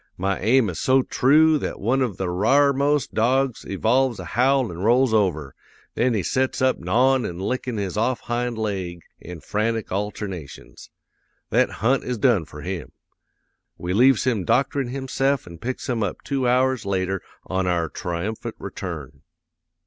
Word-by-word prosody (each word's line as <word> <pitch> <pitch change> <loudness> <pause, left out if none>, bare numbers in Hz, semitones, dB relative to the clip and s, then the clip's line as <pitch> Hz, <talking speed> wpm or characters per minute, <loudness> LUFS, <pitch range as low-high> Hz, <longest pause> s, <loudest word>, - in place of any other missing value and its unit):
My 95 +1 -1
aim 115 +3 +3
is 80 - -7
so 130 0 +3
troo 155 +5 +4
that - - -4
one 125 +6 +1
of 115 -8 -1
the 95 - -2
r'armost 140 +8 +2
dogs 130 +2 +1
evolves 120 +5 +1
a - - -6
howl 130 -1 +2
an' 85 - -8
rolls 120 +4 +3
over; 80 -10 +1 0.4
then 120 0 +1
he 100 - 0
sets 130 +6 0
up 130 0 +2
gnawin' 125 +8 +2
an' 85 -5 -4
lickin' 125 +4 -3
his 100 -1 -3
off 120 +3 0
hind 120 0 -2
laig 95 -6 -3 0.2
in 85 -2 -9
frantic 110 +1 -2
alternations. 95 -5 -6 0.6
That - - +3 0.2
hunt 135 +2 +3
is 125 -1 -3
done 110 -8 +3
for 75 -1 -11
him. 90 -2 -5 0.8
We 90 +1 -3
leaves 125 +3 +4
him 120 -7 0
doctorin' 135 +6 +1
himse'f 135 0 -1
an' 85 -2 -11
picks 130 +6 -4
him 120 -3 -1
up 105 - -3
two 135 -3 -1
hours 130 0 +2
later 95 -1 -1 0.2
on 95 0 -1
our 85 -2 +1
triumphant 90 +7 -4
return. 70 -2 -7
115 Hz, 160 wpm, -23 LUFS, 95-130 Hz, 0.8 s, troo